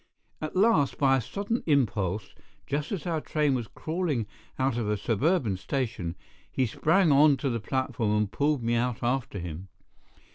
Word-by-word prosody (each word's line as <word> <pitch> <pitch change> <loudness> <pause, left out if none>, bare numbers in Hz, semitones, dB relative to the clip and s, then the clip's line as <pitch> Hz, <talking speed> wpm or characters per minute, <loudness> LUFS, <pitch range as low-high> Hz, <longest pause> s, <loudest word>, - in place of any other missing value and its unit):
At 155 +2 -4
last, 185 - +3
by 135 -2 +4
a - - -1
sudden 205 - -3
impulse, 105 - 0 0.3
just 145 +2 -2
as 195 -5 -3
our 165 -3 -1
train 150 -3 +1
was 120 -4 -2
crawling 160 - -2 0.3
out 130 -2 +1
of 115 -3 -1
a 105 - +1
suburban 115 - +1
station, 100 -5 -3 0.4
he 130 - +1
sprang 160 - +3
on 145 0 +6
to 135 +1 -1
the 115 - -1
platform 115 -3 -1
and 105 -2 0
pulled 145 -1 +1
me 115 +1 +1
out 120 +1 0
after 125 -3 -1
him. 85 +1 -6
130 Hz, 170 wpm, -28 LUFS, 110-150 Hz, 0.4 s, on